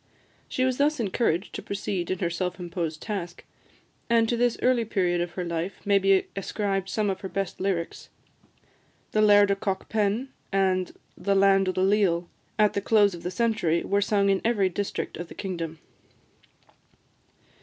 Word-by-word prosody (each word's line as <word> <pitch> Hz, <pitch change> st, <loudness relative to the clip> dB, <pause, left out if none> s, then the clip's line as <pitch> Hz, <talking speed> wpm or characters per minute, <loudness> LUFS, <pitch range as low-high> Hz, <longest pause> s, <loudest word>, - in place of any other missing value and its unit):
She 255 Hz, -, 0 dB
was 255 Hz, -1 st, 0 dB
thus 295 Hz, 0 st, +2 dB
encouraged 200 Hz, -3 st, 0 dB
to -, -, -5 dB
proceed 195 Hz, -3 st, -3 dB
in 185 Hz, -, -1 dB
her 170 Hz, -1 st, -1 dB
self 180 Hz, +2 st, -3 dB
imposed 170 Hz, -3 st, -4 dB
task; 180 Hz, -5 st, -5 dB, 0.7 s
and 230 Hz, -1 st, +4 dB
to 240 Hz, -, +1 dB
this 240 Hz, 0 st, +1 dB
early 250 Hz, -2 st, +3 dB
period 180 Hz, -5 st, 0 dB
of 175 Hz, -1 st, -3 dB
her 180 Hz, 0 st, -3 dB
life 170 Hz, +2 st, -3 dB
may 200 Hz, -1 st, +4 dB
be 195 Hz, 0 st, +3 dB
ascribed 195 Hz, -1 st, -2 dB
some 210 Hz, -1 st, 0 dB
of 190 Hz, -, -6 dB
her 190 Hz, -, -5 dB
best 195 Hz, -1 st, -3 dB
lyrics. 185 Hz, -3 st, -2 dB, 1.0 s
"The 215 Hz, -, +2 dB
Laird 205 Hz, -1 st, +6 dB
o' -, -, +3 dB
Cockpen," 205 Hz, +4 st, -1 dB, 0.2 s
and 190 Hz, -2 st, +1 dB, 0.2 s
"The 200 Hz, -1 st, 0 dB
Land 195 Hz, -1 st, +4 dB
o' -, -, +2 dB
the 185 Hz, 0 st, 0 dB
Leal," 190 Hz, -4 st, +2 dB, 0.3 s
at 210 Hz, -1 st, +4 dB
the 200 Hz, -, -1 dB
close 205 Hz, -1 st, +4 dB
of 170 Hz, -, -8 dB
the 180 Hz, -, -3 dB
century, 185 Hz, -5 st, +1 dB
were 200 Hz, 0 st, +1 dB
sung 200 Hz, -1 st, +2 dB
in 195 Hz, -, +1 dB
every 210 Hz, -5 st, +2 dB
district 200 Hz, +2 st, -4 dB
of 175 Hz, -, -6 dB
the -, -, -12 dB
kingdom. 170 Hz, -4 st, -4 dB
195 Hz, 175 wpm, -26 LUFS, 180-210 Hz, 1.0 s, Laird